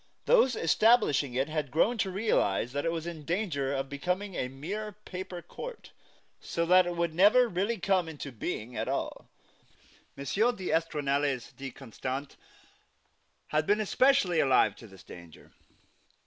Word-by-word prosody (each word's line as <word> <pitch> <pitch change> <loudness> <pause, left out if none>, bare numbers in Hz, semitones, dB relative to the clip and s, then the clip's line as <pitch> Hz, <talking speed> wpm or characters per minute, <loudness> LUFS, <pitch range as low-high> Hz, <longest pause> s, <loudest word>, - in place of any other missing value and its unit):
Those 265 - +4
establishing 165 - +3
it 135 +3 +1
had 155 -2 -3
grown 220 - +2
to 195 - +1
realize 185 - 0
that 145 +2 -3
it 165 - +1
was 165 -1 -4
in 165 -3 -6
danger 160 -6 -1
of 135 -1 -2
becoming 180 +8 -3
a 125 - -2
mere 195 +11 -6
paper 180 -1 -7
court, 485 - -9 0.5
so 170 - -2
that 180 +1 +5
it 175 - -3
would 170 -1 -1
never 210 +8 +5
really 205 +3 -1
come 185 -2 +1
into 145 -3 -7
being 115 0 -5
at 110 +1 -2
all. - - -4 0.9
M. 140 - -6 0.3
d'Estournelles 145 - -1
de 135 0 -6
Constant 135 +2 -6 1.1
had 155 0 0
been 205 +1 +3
especially 215 -5 +3
alive 135 -3 +4
to 115 - -12
this 95 -3 -15
danger. 85 -2 -13
165 Hz, 150 wpm, -29 LUFS, 140-195 Hz, 1.1 s, that